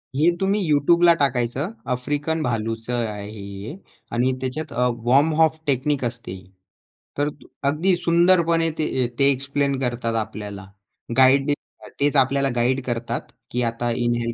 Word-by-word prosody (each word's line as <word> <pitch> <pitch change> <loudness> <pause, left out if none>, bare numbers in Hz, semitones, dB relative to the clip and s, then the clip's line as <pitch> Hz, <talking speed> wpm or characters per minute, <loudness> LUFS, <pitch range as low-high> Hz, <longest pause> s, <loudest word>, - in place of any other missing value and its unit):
हे 145 - +1 0.2
तुम्ही 195 +2 +1
YouTubeला 170 +4 +5
टाकायचं. 130 +2 0 0.2
आफ्रिकन 145 +5 -1
भालूचं 115 -1 -2 0.2
आहे 105 -1 -6
हे 100 +4 -8 0.4
आणि 125 +2 +2
त्याच्यात 140 +4 -4
अ, 125 +1 +2 0.2
वॉर्म 140 +6 +4
अप 160 0 +4
टेक्निक 140 0 0
असते. 115 -5 -5 0.8
तर 145 +1 +1 0.4
अगदी 175 +6 +2
सुंदरपणे 170 -1 +3
ते, 130 -5 0
ते 140 0 +5
एक्सप्लेन 140 +1 -1
करतात 120 -3 -2
आपल्याला. 100 -3 -8 0.5
गाईड 135 +2 +5 0.5
तेच 145 +1 +2
आपल्याला 135 +1 +3
गाईड 125 +3 +1
करतात, 120 -1 -2 0.3
की 125 - -1
आता 120 +1 -1
इन्हेल 120 -1 0
130 Hz, 130 wpm, -23 LUFS, 120-150 Hz, 0.8 s, YouTubeला